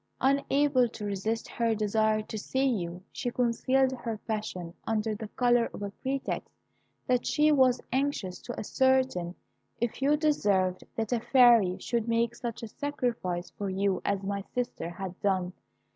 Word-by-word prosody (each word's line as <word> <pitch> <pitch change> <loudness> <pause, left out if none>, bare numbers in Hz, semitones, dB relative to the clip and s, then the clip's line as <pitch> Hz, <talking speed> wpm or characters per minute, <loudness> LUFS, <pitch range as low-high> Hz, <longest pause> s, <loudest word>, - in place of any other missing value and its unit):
"Unable 275 -1 +3
to 215 -2 -7
resist 205 +3 -2
her 230 -1 0
desire 215 0 +1
to 215 - -8
see 260 +5 -1
you, 180 -8 -1
she 245 - -3
concealed 255 +2 +2
her 235 -3 -4
passion 210 -6 -3
under 220 0 0
the 215 +1 -6
colour 240 +1 +2
of - - -6
a 200 - -4
pretext 270 +1 -2 0.6
that 250 -1 +1
she 305 0 +4
was 260 -4 +4
anxious 260 -9 -1
to 245 - -6
ascertain 260 -8 +1 0.4
if 235 +2 -2
you 290 +2 +4
deserved 200 - +1
that 225 +1 -1
a 240 - +2
fairy 235 -7 +5
should 235 -2 -2
make 230 0 +1
such 240 -1 -6
a - - -4
sacrifice 230 -10 -3
for 200 -1 -4
you 195 0 0
as 200 -1 -1
my 200 0 -2
sister 245 -9 -2
had 185 +1 -7
done. 185 -2 0
230 Hz, 160 wpm, -29 LUFS, 200-255 Hz, 0.6 s, fairy